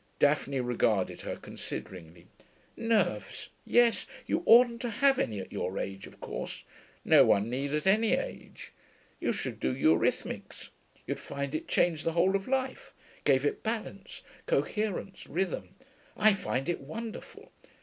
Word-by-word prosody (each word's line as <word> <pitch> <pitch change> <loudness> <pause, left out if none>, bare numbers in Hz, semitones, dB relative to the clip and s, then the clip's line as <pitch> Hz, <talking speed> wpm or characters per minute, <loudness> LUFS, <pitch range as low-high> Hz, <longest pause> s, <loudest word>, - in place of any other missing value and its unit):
Daphne 140 -2 +2
regarded 115 -5 0
her - - -4
consideringly. 85 -2 -8 0.5
'Nerves. 200 - 0 0.2
Yes. 240 -1 +3 0.2
You 330 - 0
oughtn't 235 0 +7
to 245 - -2
have 270 +5 +3
any 105 -3 -1
at 95 - -8
your 95 - -3
age, 95 0 -4
of - - -16
course. - - -6 0.4
No - - +7
one 105 +4 +3
need, 135 +3 -2
at 150 +3 -1
any 215 +3 +4
age. - - -5 0.5
You - - 0
should - - -4
do 65 - 0
eurhythmics. - - 0 0.4
You'd - - -3
find 140 0 -5
it 155 - -3
changed 165 -3 +2
the 165 - 0
whole 180 +3 +3
of 195 0 -2
life 260 0 -2 0.3
gave 135 0 +4
it 145 - -1
balance, 220 -3 -5 0.2
coherence, 215 - -1
rhythm. 190 +1 -3 0.4
I 215 0 +6
find 135 -8 -2
it 175 - -1
wonderful. 220 +11 -8
175 Hz, 145 wpm, -30 LUFS, -, 0.5 s, oughtn't